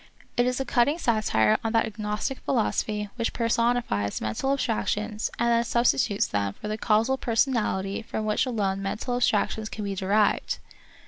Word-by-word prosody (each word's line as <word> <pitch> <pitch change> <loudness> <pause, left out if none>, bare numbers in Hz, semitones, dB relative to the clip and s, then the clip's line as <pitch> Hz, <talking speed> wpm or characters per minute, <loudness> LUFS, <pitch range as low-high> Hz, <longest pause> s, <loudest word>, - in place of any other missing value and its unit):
It 245 0 +3
is 250 0 0
a 270 - -1
cutting 265 +6 +2
satire 215 - +2
on 225 0 -1
that 225 - +3
agnostic 215 +3 -3
philosophy 210 -4 -1
which 230 -1 -1
per 235 - -1
sonifies 230 - +1
mental 110 - -1
abstractions 215 -4 -1
and 235 +1 +1
then 235 0 +3
substitutes 235 -3 +2
them 100 -1 -1
for 210 - -8
the 215 - -2
causal 230 +5 +2
personality 225 -5 0
from 220 -1 -4
which 215 +4 +1
alone 195 -5 -1
mental 215 +5 -2
ab - - -3
stractions 215 -1 +1
can 215 - -6
be 200 -1 -2
derived. 200 +2 +1
220 Hz, 170 wpm, -26 LUFS, 205-240 Hz, -, It